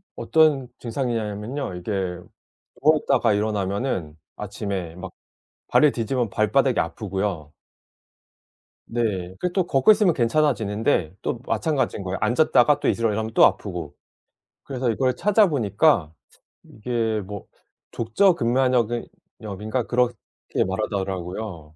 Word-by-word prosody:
어떤 155 -5 +3
증상이냐면요. 115 -1 -3
이게 90 +4 -6 0.9
누워 155 +2 +5
있다가 125 -6 +2
일어나면은 100 - -2 0.2
아침에 100 -4 -5
막 90 0 -8 0.6
발을 150 -2 +5
디디면 120 0 -1
발바닥이 115 +5 +2
아프고요. 90 -3 -3 1.3
네. 100 -6 -2
그리고 180 -1 -2
또 185 -2 +1
걷고 135 +4 +5
있으면 205 -5 +4
괜찮아지는데 115 - +1
또 120 - -3
마찬가지인 145 - -1
거예요. 95 0 -3
앉았다가 145 +1 +3
또 - - -1
일어나려면 110 -1 0
또 - - +7
아프고. 90 -7 -2 0.7
그래서 130 -3 -2
이걸 130 +2 0
찾아 210 - +4
보니까 110 - +2 0.5
이게 110 -1 -2
뭐 100 0 -8 0.5
족저근막염 120 - +2 0.4
염인가 110 +3 -3
그렇게 125 +1 +1 0.5
말하더라고요. 95 -4 -4
110 Hz, 290 characters per minute, -23 LUFS, 100-130 Hz, 1.3 s, 또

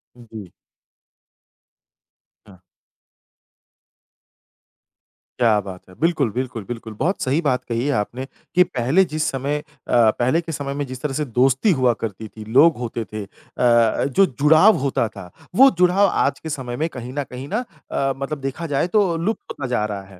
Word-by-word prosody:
जी। 110 -6 -11 1.9
हाँ। 100 -3 -16 2.8
क्या 115 -3 +4
बात 95 -2 -9
है। 90 - -15
बिल्कुल, 155 -6 +1
बिल्कुल, 120 -2 -4
बिल्कुल। 115 -2 -7
बहुत 175 +8 0
सही 140 +5 +1
बात 130 -5 0
कही 115 +2 -1
है - - +2
आपने 125 +4 -3 0.3
कि 180 - +7
पहले 135 +4 +2
जिस 155 -1 -2
समय 140 +2 -2
अ, - - -12 0.6
पहले 130 +7 +2
के 165 -1 -7
समय 140 -2 -4
में 145 0 -3
जिस 130 0 -8
तरह 150 -3 -2
से 150 +2 -1
दोस्ती 130 - +2
हुआ 130 -6 +3
करती 110 0 -5
थी, 110 0 -11
लोग 145 +9 +5
होते 120 -1 -4
थे 105 -1 -4
अ, - - -12 0.3
जो 120 - +3
जुड़ाव 160 +9 +6
होता 130 -4 0
था, 95 -4 -11 0.3
वो 270 +5 +8
जुड़ाव 180 +3 +4
आज - - 0
के 160 - -7
समय 130 -5 -4
में 160 +2 0
कहीं 125 -3 -8
न 145 +1 -2
कहीं 130 +2 -7
ना 210 +9 -1 0.3
अ, 135 0 0
मतलब 140 +2 -4
देखा 135 +5 -4
जाए 145 +3 0
तो 195 -3 +2
लुप्त 200 +7 -3
नज़ा 125 -4 -1
आ - - 0
रहा 100 -2 -5
है। 95 -1 -16
130 Hz, 170 wpm, -21 LUFS, 115-155 Hz, 2.8 s, वो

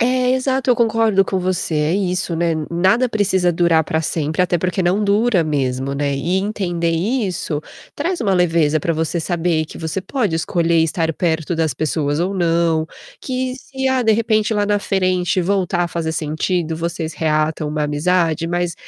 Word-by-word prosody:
É, 250 +1 +2
exato. 260 0 0
Eu 245 - +5
concordo 225 -4 +3
com 190 - -1
você, 180 -3 -2
é 150 +3 +1
isso, 185 -2 -1
né, 165 0 +1 0.2
nada 190 +9 +2
precisa 190 -5 +1
durar 165 -2 +3
para 160 -2 -1
sempre, 160 +1 -1
até 175 -1 +1
porque 185 +2 -1
não 185 +4 +1
dura 205 -2 +2
mesmo, 135 -3 -1
né. 140 0 -1
E 175 +7 0
entender 180 -5 -1
isso 180 - -1 0.3
traz 340 +3 -2
uma 195 -4 +1
leveza 165 -4 +2
para 165 - 0
você 160 +2 -1
saber 165 -1 0
que 155 - -11
você 160 +3 -3
pode 210 -4 -1
escolher 165 0 +1
estar 165 0 +1
perto 165 0 -1
das 160 -2 0
pessoas 145 +1 -1
ou 185 +4 -1
não. 165 -2 +1 0.4
Que 255 -1 -3
se, 265 0 -5
ah, 260 -1 +2
de 220 - +4
repente 215 0 +1
lá 205 -1 +1
na 205 0 +2
frente 185 -2 0
voltar 180 -1 0
a - - -3
fazer 165 -1 -3
sentido, 160 +2 -1
vocês 165 -1 -4
reatam 155 0 0
uma 150 0 -1
amizade, 165 +2 +1
mas 175 -1 -1
175 Hz, 180 wpm, -19 LUFS, 160-200 Hz, 0.4 s, Eu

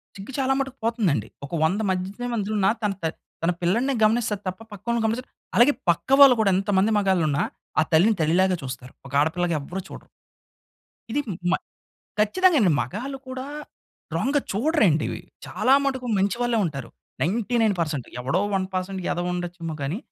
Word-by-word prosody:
సిగ్గు 200 +6 -9
చాలా 265 0 +2
మటుకు 270 -1 -3
పోతుందండి. 210 - +1 0.2
ఒక - - -13
వంద 180 +6 +2
మధ్యతే 190 +6 -3
మధ్యలున్న 210 -3 0
తన 210 -1 +1
త - - 0 0.4
తన 170 - +3
పిల్లడినే 230 +11 +1
గమనిస్తది 215 -2 +2
తప్ప, 185 +3 -4
పక్కోలిని 230 +4 -2
గమనించదు. 230 +4 -1 0.3
అలాగే 260 +5 +6 0.2
పక్క 170 - +1
వాళ్ళు 265 -3 +9
కూడా 200 - +3
ఎంతమంది 195 +2 +2
మగాళ్ళున్నా 175 -8 +2 0.4
ఆ - - +6
తల్లిని 195 +8 +5
తల్లిలాగా 180 +4 +3
చూస్తారు. 130 -1 -7
ఒక 135 - -13
ఆడపిల్లగా 170 +2 0
ఎవ్వరు 180 +7 -5
చూడరు. - - -11 1.0
ఇది 290 +5 +1 0.3
మ - - +4 0.7
ఖచ్చితంగానండి. 255 - +4
మగాళ్ళు 245 - -5
కూడా 260 +1 -5 0.7
రాంగ్‌గా 285 +1 +1
చూడరండి 215 - +2
ఇవి. - - -5 0.3
చాలా 260 - +2
మటుకు 260 -2 -2
మంచి 195 +3 +1
వాళ్ళే 240 -1 +1
ఉంటారు. 140 -7 -5 0.3
99% 195 - 0
ఎవడో 140 +10 0
1% 190 0 -2
ఎదవుండచ్చేమో 175 -2 -3
గానీ 145 +8 -2
195 Hz, 145 wpm, -24 LUFS, 175-235 Hz, 1.0 s, వాళ్ళు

